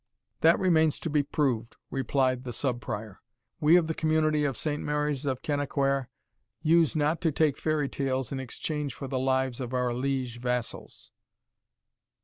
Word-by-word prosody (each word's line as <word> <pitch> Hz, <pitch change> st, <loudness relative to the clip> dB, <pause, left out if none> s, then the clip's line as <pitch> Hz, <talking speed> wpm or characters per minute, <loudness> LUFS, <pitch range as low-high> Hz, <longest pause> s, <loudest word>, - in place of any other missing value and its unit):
"That 165 Hz, +1 st, +5 dB
remains 160 Hz, -5 st, +3 dB
to 165 Hz, -, -3 dB
be 150 Hz, -1 st, +3 dB
proved," 130 Hz, -6 st, -1 dB, 0.2 s
replied 130 Hz, -1 st, +1 dB
the 125 Hz, -2 st, -5 dB
Sub 125 Hz, -2 st, -1 dB
Prior; 105 Hz, -3 st, -6 dB, 0.4 s
"we 155 Hz, +3 st, +6 dB
of 175 Hz, -, +3 dB
the 160 Hz, -, -2 dB
community 155 Hz, -1 st, +2 dB
of 135 Hz, -5 st, -1 dB
Saint 150 Hz, -1 st, -2 dB
Mary's 150 Hz, -1 st, -1 dB
of 130 Hz, -2 st, -2 dB
Kennaquhair, 140 Hz, -2 st, 0 dB, 0.5 s
use 165 Hz, -1 st, +4 dB
not 155 Hz, +3 st, +1 dB
to 165 Hz, -3 st, +2 dB
take 150 Hz, -1 st, +2 dB
fairy 155 Hz, -2 st, 0 dB
tales 135 Hz, -2 st, -2 dB
in 135 Hz, -, -3 dB
exchange 145 Hz, +2 st, -4 dB
for 135 Hz, -, -6 dB
the 130 Hz, -1 st, -2 dB
lives 130 Hz, -1 st, 0 dB
of 130 Hz, 0 st, -4 dB
our 125 Hz, -1 st, +1 dB
liege 130 Hz, -1 st, -2 dB
vassals." 125 Hz, -1 st, -4 dB
140 Hz, 160 wpm, -28 LUFS, 130-155 Hz, 0.5 s, we